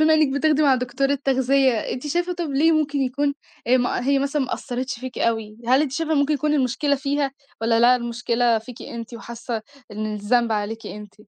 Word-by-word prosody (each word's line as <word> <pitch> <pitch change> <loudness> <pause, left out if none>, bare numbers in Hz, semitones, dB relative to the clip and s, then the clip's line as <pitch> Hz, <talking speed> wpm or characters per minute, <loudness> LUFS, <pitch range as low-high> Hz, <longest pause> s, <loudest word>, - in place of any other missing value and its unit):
بما 315 0 +5
إنكِ 305 -3 +3
بتاخدي 305 +1 +2
مع 275 -3 +5
دكتورة 260 +3 0
تغذية، 265 0 +3
أنتِ 250 +5 -3
شايفة 350 +4 0
طَب 345 -3 -4
ليه 310 +4 +3
ممكن 295 -2 +1
يكون، 280 +2 0 0.3
آآ 255 - +5
ما 245 0 0
هي 280 0 +3
مثلًا 280 +1 0
ما 255 - -2
أثّرتش 255 +2 -4
فيكِ 255 -1 -6
أوي؟ 220 -2 -1
هل 265 +3 +5
أنتِ 275 -4 -2
شايفة 320 +1 -1
إن - - +3
ممكن 290 +2 +2
يكون 300 +2 0
المشكلة 280 +2 +1
فيها؟ 280 0 -1 0.3
والّا 225 0 +2
لا، 245 +1 +6
المشكلة 235 -1 0
فيكِ 235 +2 -11
أنتِ، 235 0 -7
وحاسة 230 -1 -6 0.3
إن 215 0 -3
الذنب 230 +3 +1
عليكِ 215 +1 -3
أنتِ؟ 210 -1 -9
260 Hz, 200 wpm, -23 LUFS, 235-285 Hz, 0.3 s, لا